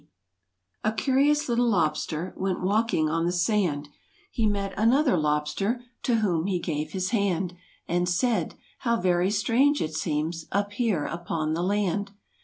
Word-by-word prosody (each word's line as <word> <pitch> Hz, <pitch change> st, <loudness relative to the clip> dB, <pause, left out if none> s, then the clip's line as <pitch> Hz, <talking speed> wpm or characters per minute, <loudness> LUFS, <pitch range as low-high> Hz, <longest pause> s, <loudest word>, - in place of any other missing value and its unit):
Zj 215 Hz, +1 st, 0 dB
curious 285 Hz, +2 st, +2 dB
little 240 Hz, 0 st, +2 dB
lobster 165 Hz, -3 st, 0 dB
J -, -, -10 dB
"Went 190 Hz, -1 st, -1 dB
walking 205 Hz, -4 st, +2 dB
on 165 Hz, +2 st, 0 dB
the -, -, +1 dB
sand 175 Hz, -5 st, 0 dB, 0.2 s
— -, -, -34 dB
He 225 Hz, -2 st, +1 dB
met 200 Hz, -1 st, -1 dB
another 250 Hz, +5 st, +3 dB
lobster 150 Hz, +10 st, 0 dB, 0.2 s
To 240 Hz, -, +1 dB
whom 175 Hz, -4 st, +1 dB
he 190 Hz, -2 st, +1 dB
gave 155 Hz, -3 st, -3 dB
his 185 Hz, -1 st, -1 dB
hand, 190 Hz, -5 st, 0 dB, 0.3 s
And 175 Hz, +1 st, +1 dB
said: 230 Hz, +6 st, 0 dB, 0.2 s
"How 235 Hz, -2 st, +1 dB
very 180 Hz, 0 st, +2 dB
strange 240 Hz, +8 st, +2 dB
it 155 Hz, -, -2 dB
seems 155 Hz, +1 st, -2 dB
Up 200 Hz, +1 st, 0 dB
here 205 Hz, -9 st, 0 dB
upon 165 Hz, -2 st, -2 dB
the 165 Hz, -, -1 dB
land." 200 Hz, +1 st, 0 dB
190 Hz, 160 wpm, -26 LUFS, 165-220 Hz, 0.3 s, another